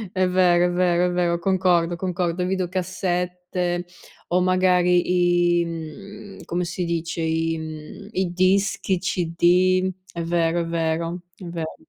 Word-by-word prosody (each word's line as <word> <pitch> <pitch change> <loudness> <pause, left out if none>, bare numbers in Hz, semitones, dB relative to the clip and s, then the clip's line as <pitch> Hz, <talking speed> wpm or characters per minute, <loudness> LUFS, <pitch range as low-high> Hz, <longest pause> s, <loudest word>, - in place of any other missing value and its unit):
È 185 0 +2
vero, 180 -1 +4
è - - -1
vero, 175 0 +2
è - - -1
vero, 175 -1 +1
concordo, 175 -2 +2
concordo. 180 0 -2
Videocassette 180 -1 -2 0.4
o 180 +1 +2
magari 180 -1 +3
i, - - -1
mhmm, 195 +5 -8
come 175 +1 -2
si 175 +1 -3
dice, 165 0 -3
i 165 0 0
mhmm, 160 +5 -8
i 190 -4 -1
dischi, 190 +2 +1
i 185 - +1
CD. 185 +1 +2 0.2
È 170 - -5
vero, 170 0 +1
è - - -2
vero, 165 +1 -2 0.2
è - - -12
vero. 165 -2 -5
175 Hz, 140 wpm, -23 LUFS, 170-185 Hz, 0.4 s, vero